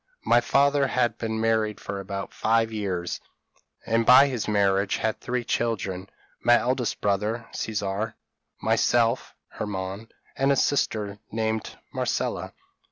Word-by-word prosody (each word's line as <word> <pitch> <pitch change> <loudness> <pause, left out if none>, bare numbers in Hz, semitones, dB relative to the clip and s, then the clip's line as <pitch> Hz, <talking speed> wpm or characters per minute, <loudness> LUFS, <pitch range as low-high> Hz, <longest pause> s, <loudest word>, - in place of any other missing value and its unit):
My 120 - +5
father 140 +2 +3
had 125 -2 0
been 110 -1 -2
married 110 -2 +1
for 100 - -5
about 100 +1 -5
five 115 0 +2
years; 95 -5 -3 0.7
and 115 0 +2
by 125 +4 +8
his 125 -5 -3
marriage 100 -1 +2
had 110 0 -1
three 125 0 -2
children 100 -6 -2 0.3
my 120 0 +6
eldest 125 -1 -1
brother 105 +3 0
Caesar, 105 +1 -3 0.4
myself 120 +1 +2
(Hermann), 100 +1 -5 0.3
and 135 +1 +2
a - - +4
sister 105 -7 0
named 110 0 -2 0.2
Marcella. - - -2
110 Hz, 125 wpm, -26 LUFS, 100-120 Hz, 0.7 s, by